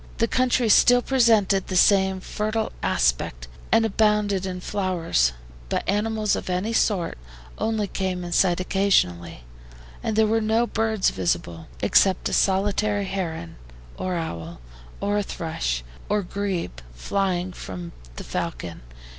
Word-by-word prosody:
The 230 - +2
country 255 0 +2
still 245 +3 +6
presented 220 -7 +3
the 185 - -3
same 190 0 +4
fertile 215 +3 -2
aspect, - - 0 0.2
and 225 - +4
abounded 210 -2 +1
in 180 -1 -4
flowers, 180 - 0 0.4
but - - -1
animals 215 +1 +1
of - - -5
any 185 +5 -1
sort 185 - 0 0.4
only 220 -1 0
came 185 -2 -3
in 175 - -6
sight 175 0 +3
occasionally, 90 - +1 0.6
and 220 - -2
there 220 0 +4
were 225 +1 +1
no 220 +2 +2
birds 220 -3 0
visible, 85 -2 -2 0.2
except 190 -2 +3
a - - -4
solitary 205 +1 +1
heron 170 - -4 0.4
or 185 -1 -3
owl, 85 - -5 0.4
and 205 +1 +1
a - - +1
thrush 60 - -3 0.3
or 205 0 +1
grebe, 185 - -3 0.2
flying 185 - -1
from 90 - -7 0.2
the - - -7
falcon. 80 +6 -5
195 Hz, 135 wpm, -24 LUFS, 170-215 Hz, 0.6 s, still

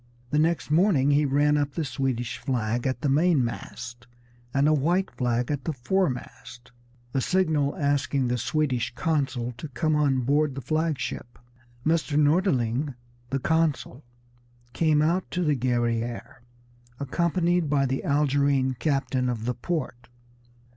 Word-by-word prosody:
The 150 - +2
next 160 -1 0
morning 155 -5 +4
he 145 +1 +3
ran 145 +2 +3
up 145 -1 -1
the 165 - -1
Swedish 120 -2 -2
flag 120 -1 -1
at 130 - -2
the 150 - 0
mainmast, 125 -5 -1 0.4
and 140 +3 +2
a 155 - +4
white 175 +6 +1
flag 125 +1 -1
at 140 -2 -3
the 160 - -1
foremast, 125 -4 -3 0.4
a 135 - +1
signal 155 -3 +1
asking 140 -3 0
the 125 0 -1
Swedish 130 -2 -1
consul 135 -6 -1
to 155 - -5
come 155 +3 0
on 140 -3 +2
board 145 +2 +1
the 135 - -5
flag 155 +3 0
ship. 120 -1 -6 0.5
Mr. 155 -2 +1
Norderling, 145 - +2 0.3
the 135 - 0
consul, 150 -2 0 0.7
came 155 +3 +3
out 175 +4 0
to 180 - -1
the 150 -3 +2
Guerrière, 120 -2 -1 0.6
accompanied 170 +3 0
by 140 -1 +2
the 135 0 -2
Algerine 140 -2 +2
captain 135 -4 0
of 115 -2 -3
the 125 - 0
port. 125 -4 -4
140 Hz, 140 wpm, -26 LUFS, 125-155 Hz, 0.7 s, morning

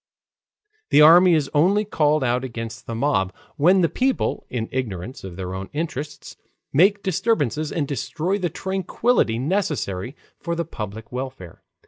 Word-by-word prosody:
The 150 - +6
army 175 +3 +8
is 150 -3 +1
only 195 +8 +3
called 155 -6 +2
out 125 0 +1
against 115 -2 -6
the 115 - -4
mob, 115 -7 +1 0.2
when 180 +6 +4
the 170 - +4
people, 255 - -1
in 115 -3 -3
ignorance 120 -2 -4
of 95 -2 -8
their 90 0 -5
own 95 +1 -6
interests, 150 -1 -5 0.4
make 200 +7 +4
disturbances 155 - 0
and 150 -4 -1
destroy 155 +8 -2
the 180 -2 -1
tranquillity 190 - 0
necessary 135 - -2 0.2
for 170 0 -3
the 170 0 -2
public 110 -6 -7
welfare. 125 -9 -7
145 Hz, 145 wpm, -23 LUFS, 115-175 Hz, 0.4 s, army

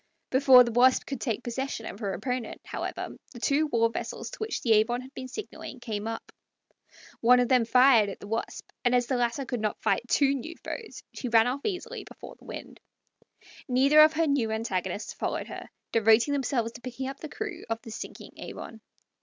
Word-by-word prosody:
Before 260 -1 +8
the 235 - -3
Wasp 250 +2 +4
could 275 -3 -5
take 235 -2 -2
possession 245 -1 -4
of 200 - -7
her 200 -4 -2
opponent, 250 +1 -4
however, - - -4 0.2
the 240 - -9
two 285 +5 +2
war 230 -5 +3
vessels - - -5
to - - -10
which 435 0 -3
the 230 - +1
Avon 225 +3 +3
had 260 +2 -13
been 260 - -6
signaling 265 - -8
came 220 -3 -4
up. 225 - -6 0.9
One 250 +2 +6
of 245 - +2
them 250 -3 +4
fired 250 -3 +5
at 195 - -8
the - - -10
Wasp, 225 +2 -4 0.2
and 245 -1 +3
as 245 0 +3
the 260 - -1
latter 245 +3 0
could 245 -1 -3
not 215 -1 -2
fight - - +2
two 275 +2 +3
new 280 +5 -5
foes, 450 -3 -7
she 250 - -4
ran 225 -1 +5
off 255 +3 -2
easily 375 -4 -3
before - - -11
the - - -20
wind. - - -9 0.9
Neither 275 +4 +5
of 310 0 +7
her 325 +1 +2
new 280 -7 +1
antagonists 200 -3 -2
followed - - -3
her, - - -8 0.2
devoting 225 +5 +4
themselves 255 -4 0
to 240 - -12
picking 255 +2 -5
up 270 0 -6
the 310 - -7
crew 425 +6 -6
of 225 0 -1
the 225 - -9
sinking 220 - -8
Avon. 225 -1 -8
245 Hz, 205 wpm, -28 LUFS, 225-275 Hz, 0.9 s, Before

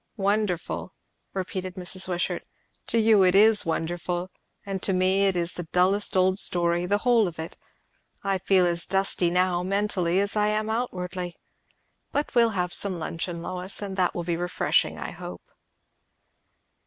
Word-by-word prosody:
"Wonderful!" 200 -3 -1 0.4
repeated 185 -1 -5
Mrs. 185 0 +1
Wishart. 180 -1 -2 0.5
"To - - 0
you 220 -2 +5
it 180 0 +3
is 210 -1 +5
wonderful. 175 +2 -3 0.3
And 195 -2 -4
to 195 - +1
me 190 +2 +3
it 190 - +1
is 170 0 -1
the 175 -2 -6
dullest 190 +2 +2
old 185 +1 +3
story, 175 0 +2
the 205 +2 +2
whole 230 -1 +3
of 170 - -7
it. 160 +1 -6 0.7
I 195 -1 0
feel 190 -1 +3
as 170 -1 0
dusty 195 -2 +1
now, 180 0 +1
mentally, 190 -2 0
as 200 +1 0
I 210 0 +2
am 215 +1 0
outwardly. 180 -6 -3 0.8
But 290 - -2
we'll 235 -2 +4
have 180 -1 -1
some 195 -3 +2
luncheon, 170 +1 -5
Lois, 185 +2 -3
and 200 -2 -5
that 185 -2 +1
will 175 - -3
be 170 0 -1
refreshing, 175 +1 0
I - - -5
hope." - - -9
185 Hz, 160 wpm, -25 LUFS, 175-200 Hz, 0.8 s, you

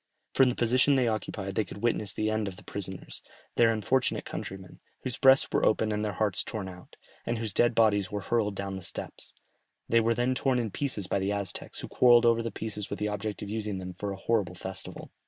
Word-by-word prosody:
From 135 -1 +5
the 125 - -1
position 125 +4 +4
they 130 -2 +3
occupied 105 -3 -3
they 110 - +1
could 100 +2 -10
witness 110 -4 +1
the 110 +3 -1
end 110 -1 0
of 95 - -5
the - - -12
prisoners, 95 -2 -5 0.3
their 115 -1 +5
unfortunate 120 +4 0
countrymen, 95 -1 -7 0.2
whose 125 -3 -3
breasts 135 0 +6
were - - +1
opened 110 0 +2
and 105 0 -1
their 105 -1 -1
hearts 100 0 0
torn 105 -4 -4
out, 90 -1 -12 0.3
and 120 - -1
whose 110 -3 -3
dead 120 +1 +3
bodies 105 -4 +3
were 105 0 -2
hurled 105 0 0
down 100 0 -4
the - - -7
steps; - - -7 0.5
they 115 - +4
were 115 +1 +2
then 120 +2 +1
torn 130 0 +1
in 115 -4 -1
pieces 130 -7 -2
by 100 - 0
the 95 +1 0
Aztecs, 100 -2 -4
who - - -6
quarrelled 120 -1 +6
over 115 0 +4
the 115 - -2
pieces 105 -1 -5
with 100 - -3
the 105 - -1
object 105 0 -4
of 100 - -6
using 105 -2 -3
them 90 0 -6
for 100 +2 -4
a 95 - -5
horrible 95 -3 0
festival. - - -7
110 Hz, 230 wpm, -29 LUFS, 100-115 Hz, 0.5 s, breasts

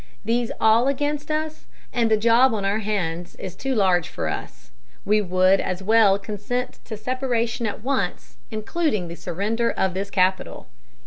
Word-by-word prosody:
These 235 +1 0
all 225 +3 +4
against 290 +2 -1
us, 310 0 -3 0.3
and 235 -2 +2
the 220 - +4
job 230 +3 +4
on 200 -2 -2
our 200 +2 +1
hands 180 -5 -3
is 185 -1 -7
too 270 +6 -2
large 185 -5 +3
for - - -4
us. - - -7 0.3
We 210 +1 +3
would 185 0 +3
as 185 +1 -3
well 215 -1 +5
consent 215 +5 -4
to 220 - -6
separation 240 -1 -1
at 210 +1 -5
once, 240 -9 -2
including 215 - -1
the 170 - -6
surrender 220 +8 -1
of 190 -1 0
this 195 +2 -3
capital." 185 -1 0
215 Hz, 165 wpm, -23 LUFS, 190-245 Hz, 0.3 s, well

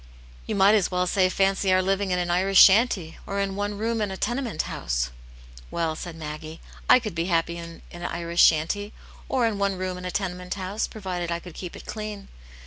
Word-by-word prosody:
"You - - -2
might 200 +1 +6
as 205 -4 +3
well 180 0 0
say 185 0 +2
fancy 195 0 +2
our 185 - +5
living 195 +1 0
in 180 - +1
an 175 -1 -1
Irish 190 +2 +4
shanty, 195 -5 +5
or 200 0 -2
in 195 -1 -1
one 205 0 -2
room 225 +1 -1
in 210 - 0
a 190 - -5
tenement 240 - -1
house," - - -2 0.6
"Well," 165 -2 -1
said 170 +1 -7
Maggie, 155 0 -7 0.3
"I - - +9
could 230 -6 -4
be 165 0 -1
happy 170 -1 0
in 170 -1 -9
an 175 0 -7
Irish 170 0 0
shanty, 185 +7 +3 0.4
or 255 -3 +2
in 215 -3 -1
one 200 -1 0
room 185 0 -3
in 180 - -8
a - - -2
tenement 180 -1 -3
house, 195 +2 -2
provided 180 -5 -4
I 170 - 0
could 175 0 -11
keep 180 +1 -7
it - - -11
clean. 210 -2 -6
185 Hz, 215 wpm, -25 LUFS, 170-200 Hz, 0.6 s, I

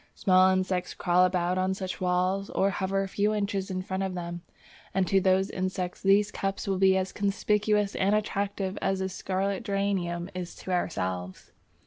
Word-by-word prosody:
Small 185 0 +5
insects 185 -1 0
crawl 180 +1 +3
about 180 0 0
on 190 +1 +1
such 190 -1 -5
walls 185 +2 +1
or 195 +1 +1
hover 195 0 -1
a - - -4
few 205 +2 0
inches 200 -2 -2
in 185 -1 -3
front 190 0 -3
of 190 -1 -2
them, 175 -1 -5 0.5
and 190 -1 +3
to 195 +1 +3
those 190 +1 +2
insects 185 -1 -3
these 200 +1 +4
cups 195 0 -3
will 190 -1 0
be 190 0 +5
as 185 0 -1
conspicuous 210 0 +1
and 200 +2 +2
attractive 200 -2 -2
as 195 0 0
a 190 0 -1
scarlet 190 +1 -2
geranium 190 -4 -1
is 180 -1 -6
to 185 - -7
ourselves. 95 - -3
190 Hz, 175 wpm, -28 LUFS, 185-195 Hz, 0.5 s, Small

